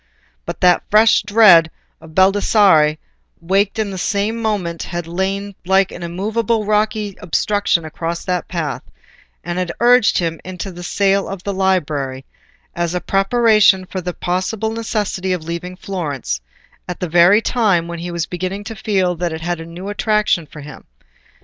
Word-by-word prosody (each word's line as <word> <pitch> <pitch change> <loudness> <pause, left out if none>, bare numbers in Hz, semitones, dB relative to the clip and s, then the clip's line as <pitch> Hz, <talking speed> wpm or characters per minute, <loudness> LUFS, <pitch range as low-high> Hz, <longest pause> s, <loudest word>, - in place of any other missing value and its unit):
But - - -6
the 180 -1 +5
fresh 220 +2 +5
dread 200 -6 +6 0.3
of 160 -1 -14
Baldassarre, 190 -5 +4 0.4
waked 195 +5 0
in 215 -2 -1
the 190 - -5
same 210 +4 -1
moment, 190 -7 -2
had 175 -1 -5
lain 195 +4 -3
like 190 +1 +2
an 175 - -9
immovable 215 +6 -1
rocky 210 -1 0
obstruction 180 -1 0
across 165 +2 -5
that 180 -2 -2
path, 155 -6 -3 0.6
and 175 +1 -3
had 180 -1 -2
urged 240 -2 +4
him 165 -2 -2
into 185 +1 -6
the 175 0 -10
sale 195 +2 +1
of 195 -2 -7
the 200 - -3
library, 150 -9 -1 0.5
as 175 0 -2
a - - 0
preparation 205 -1 +3
for 185 0 -5
the 180 0 -5
possible 190 +5 -2
necessity 210 -4 -2
of 180 -3 -4
leaving 170 +2 -6
Florence, 145 - -4 0.5
at 180 - -6
the 180 - -2
very 175 +5 +5
time 205 -8 +1
when 170 0 -6
he 175 +1 -5
was 170 -1 -2
beginning 185 +3 -4
to 225 +2 -7
feel 195 -4 0
that 175 0 -3
it 160 0 -6
had 175 0 -2
a 165 - -8
new 175 +3 -8
attraction 210 -5 0
for 150 +1 -11
him. 150 0 -11
185 Hz, 165 wpm, -18 LUFS, 170-205 Hz, 0.6 s, dread